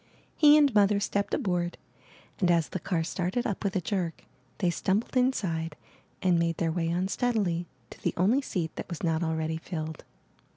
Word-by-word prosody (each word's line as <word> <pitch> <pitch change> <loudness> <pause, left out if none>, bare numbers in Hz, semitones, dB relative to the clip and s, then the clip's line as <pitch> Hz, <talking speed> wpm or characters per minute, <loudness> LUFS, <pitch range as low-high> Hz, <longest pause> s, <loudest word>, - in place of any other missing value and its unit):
He 300 -1 +7
and 285 -4 +4
Mother 205 -1 +4
stepped 200 0 -1
aboard, 175 -2 -1 0.6
and, 180 - +2
as 170 -2 +3
the 185 - -3
car 165 0 -1
started 185 +7 -2
up 205 - -2
with 200 -2 -1
a 190 - +1
jerk, 175 -2 -3 0.3
they 180 -3 +1
stumbled 195 +8 -1
inside 180 - 0 0.5
and 180 -2 +4
made 165 -1 0
their 165 -2 0
way 165 0 -1
unsteadily 185 -1 0 0.2
to - - -12
the - - -1
only 215 +10 +3
seat 175 - -3
that - - -6
was 170 - -6
not 165 -1 +1
already 160 -1 -1
filled. 160 -2 -5
180 Hz, 175 wpm, -28 LUFS, 165-200 Hz, 0.6 s, He